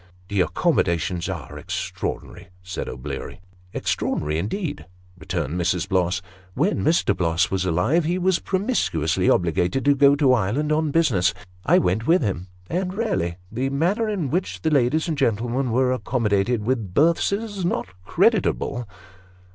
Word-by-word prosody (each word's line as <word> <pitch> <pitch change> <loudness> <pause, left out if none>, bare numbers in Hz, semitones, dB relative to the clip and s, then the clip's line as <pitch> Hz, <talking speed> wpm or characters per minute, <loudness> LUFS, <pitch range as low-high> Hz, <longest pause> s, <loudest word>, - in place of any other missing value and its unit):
" 90 0 -29
The 100 -2 +1
accommodations 85 -1 0
are - - -6
extraordinary," - - -5 0.2
said 95 0 -5
O'Bleary. 65 - -6 0.2
" 90 0 -29
Extraordinary 75 +1 -1
indeed," 145 - -4 0.3
returned 90 -2 -3
Mrs. 90 +1 0
Bloss. 95 -1 0 0.2
" 90 0 -27
When 170 +11 +1
Mr. 155 - +2
Bloss 85 0 +1
was 95 -1 0
alive, 95 - +2
he 175 +3 0
was 185 -1 +2
promiscuously 185 - 0
obligated 90 - +1
to 145 - +6
go 140 0 +5
to 140 -3 +4
Ireland 125 +8 0
on 155 0 +1
business. 115 - +2 0.3
I - - +6
went 95 +6 +1
with 170 -2 +4
him, 95 -4 -2 0.2
and 185 +2 -2
raly 145 - -1
the 130 +4 -1
manner 180 - 0
in 180 -10 -2
which 180 +3 -2
the 160 - +1
ladies 145 +4 +2
and 160 - -1
gentle 120 -3 +1
men 130 +1 -1
were 125 +2 +2
accommodated 115 -3 0
with 115 -7 -2
berths, 165 +5 +3
is 205 -2 -3
not 175 - 0 0.2
creditable." 120 +5 +1
120 Hz, 155 wpm, -23 LUFS, -, 0.3 s, to